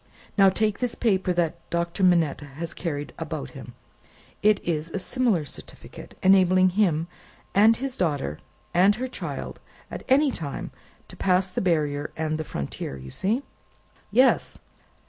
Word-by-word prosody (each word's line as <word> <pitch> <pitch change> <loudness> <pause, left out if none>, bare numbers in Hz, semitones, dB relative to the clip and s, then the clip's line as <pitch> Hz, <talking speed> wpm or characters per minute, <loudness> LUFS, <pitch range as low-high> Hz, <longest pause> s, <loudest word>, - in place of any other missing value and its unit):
Now, 195 -2 +6
take 215 +1 +1
this 245 -2 -1
paper 190 -5 +1
that 170 -1 0
Doctor 170 +2 -1
Manette 170 -6 +3
has 145 +4 -6
carried 145 -4 -4
about 65 - -5
him. - - -11 0.7
It 210 0 +4
is 160 -1 -2
a 180 - -4
similar 210 - +1
certificate, 140 - -11
enabling 185 -1 +5
him 175 -5 +1 0.5
and 220 +3 +6
his 265 -1 -4
daughter 145 - -1 0.3
and 190 +4 +5
her 255 +4 -3
child, 255 - -6 0.3
at - - -5
any 280 +2 +4
time, 145 - -5 0.4
to - - -12
pass 185 0 +1
the - - -2
barrier 150 -5 0
and 155 0 -1
the - - -1
frontier! 70 - -5
You 65 0 -10
see?" 225 - 0 0.7
"Yes!" 255 +5 +3
180 Hz, 145 wpm, -25 LUFS, 155-205 Hz, 0.7 s, Now